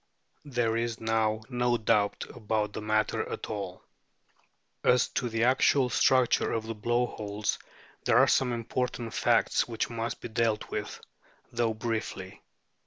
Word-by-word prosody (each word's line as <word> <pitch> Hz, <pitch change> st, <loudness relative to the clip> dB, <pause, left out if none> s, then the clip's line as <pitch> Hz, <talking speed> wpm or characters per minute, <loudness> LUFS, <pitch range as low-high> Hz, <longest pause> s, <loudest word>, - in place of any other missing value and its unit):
There 120 Hz, -5 st, 0 dB
is 115 Hz, -1 st, -2 dB
now 110 Hz, -1 st, 0 dB
no 120 Hz, -1 st, +1 dB
doubt 105 Hz, -2 st, +1 dB
about 105 Hz, -2 st, -2 dB
the -, -, -5 dB
matter 110 Hz, 0 st, 0 dB
at -, -, -5 dB
all. -, -, -5 dB, 1.0 s
As 125 Hz, 0 st, +4 dB
to 125 Hz, -, -2 dB
the 115 Hz, 0 st, 0 dB
actual 130 Hz, +1 st, +3 dB
structure 130 Hz, 0 st, +3 dB
of 110 Hz, -1 st, -2 dB
the 115 Hz, -, -4 dB
blow 120 Hz, +3 st, +1 dB
holes 105 Hz, -2 st, -3 dB, 0.5 s
there -, -, +4 dB
are -, -, +7 dB
some 130 Hz, -2 st, +2 dB
important 120 Hz, 0 st, -3 dB
facts -, -, +2 dB
which 115 Hz, 0 st, -3 dB
must 115 Hz, 0 st, -3 dB
be -, -, -6 dB
dealt 110 Hz, -1 st, 0 dB
with, 105 Hz, 0 st, -4 dB, 0.5 s
though 115 Hz, -2 st, 0 dB
briefly. 115 Hz, 0 st, -4 dB
115 Hz, 145 wpm, -29 LUFS, 110-120 Hz, 1.0 s, are